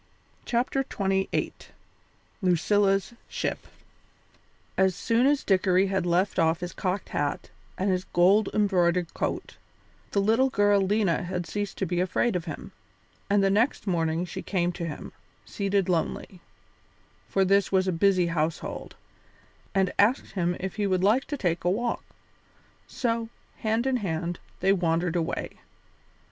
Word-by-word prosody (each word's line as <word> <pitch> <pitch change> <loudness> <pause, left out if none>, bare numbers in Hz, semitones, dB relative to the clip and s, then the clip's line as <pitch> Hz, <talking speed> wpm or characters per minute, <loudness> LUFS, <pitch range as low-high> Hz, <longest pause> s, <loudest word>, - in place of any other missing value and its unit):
CHAPTER 245 +3 0
XXVIII 195 -6 -1 0.9
LUCILLA'S 195 +3 +2 0.2
SHIP - - -3 1.1
As 190 -1 +3
soon 230 +6 +2
as 285 0 +2
Dickory 190 -1 +3
had 190 -2 0
left 180 +3 +1
off 165 0 +2
his 175 0 -5
cocked 185 0 -2
hat 145 -1 -2 0.3
and 190 +1 +1
his 185 0 -1
gold 190 +5 +4
embroidered 180 -4 +1
coat, - - -3 0.5
the 200 - 0
little 225 +6 +3
girl 205 -3 +3
Lena 195 -2 +1
had 180 0 -3
ceased 205 +5 -4
to 195 - -1
be 175 0 -1
afraid 185 +4 +1
of 175 - -2
him, - - -7 0.6
and 200 0 +3
the 195 - +3
next 225 +6 +1
morning 165 -2 0
she 175 - -6
came 175 -3 0
to 175 -1 -5
him, 150 - -7 0.3
seated 200 -2 0
lonely 180 +1 -2 0.9
for 195 -1 +2
this 200 +1 +3
was 190 -1 +2
a - - +2
busy 185 +1 +3
household 165 -1 -3 0.8
and 190 -1 +2
asked 220 +6 +3
him 175 -2 -1
if 190 +2 -5
he 205 -1 +1
would 185 -1 +1
like 220 +7 +3
to 290 - -4
take 175 -8 -1
a 175 - +2
walk. 235 +5 -1 0.8
So, 230 -2 -2 0.3
hand 220 +2 0
in 265 -1 +2
hand, 175 -4 -3 0.2
they 195 +2 +4
wandered 170 -2 0
away. 165 -2 -3
190 Hz, 145 wpm, -27 LUFS, 175-205 Hz, 1.1 s, gold